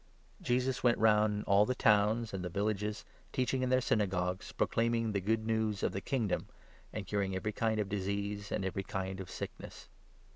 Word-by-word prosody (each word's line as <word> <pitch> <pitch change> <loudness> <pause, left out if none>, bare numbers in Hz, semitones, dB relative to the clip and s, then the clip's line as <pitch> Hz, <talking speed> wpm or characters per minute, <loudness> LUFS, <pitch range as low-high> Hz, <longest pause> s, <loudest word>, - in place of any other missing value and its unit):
The - - -23
Need - - -10
Jesus 130 +2 +1
went 120 -1 +4
round 105 -1 +3
all 100 +1 +5
the 130 +4 0
towns 110 +1 +3
and 95 -2 -3
the 90 - -3
vil 100 +4 -1
35 105 -3 -1
for 105 - -3
lages, 105 +1 -5 0.3
teaching 130 0 0
in 130 - +1
their 130 0 +4
Synagogues, 95 -6 0
proclaiming 115 0 +1
worker*. 110 - -1
the 100 - 0
Good 110 +3 0
News 110 -2 0
of - - +2
the 95 - -4
Kingdom, 115 -6 -1 0.4
and 105 -2 -5
curing 95 -1 -1
every 105 +3 -2
kind 110 -1 0
of 105 - 0
disease 100 +1 -3
and 95 - -1
every 95 +1 -2
kind 95 0 -4
of 95 - -7
sickness. - - -8
105 Hz, 215 wpm, -33 LUFS, 100-115 Hz, 0.4 s, all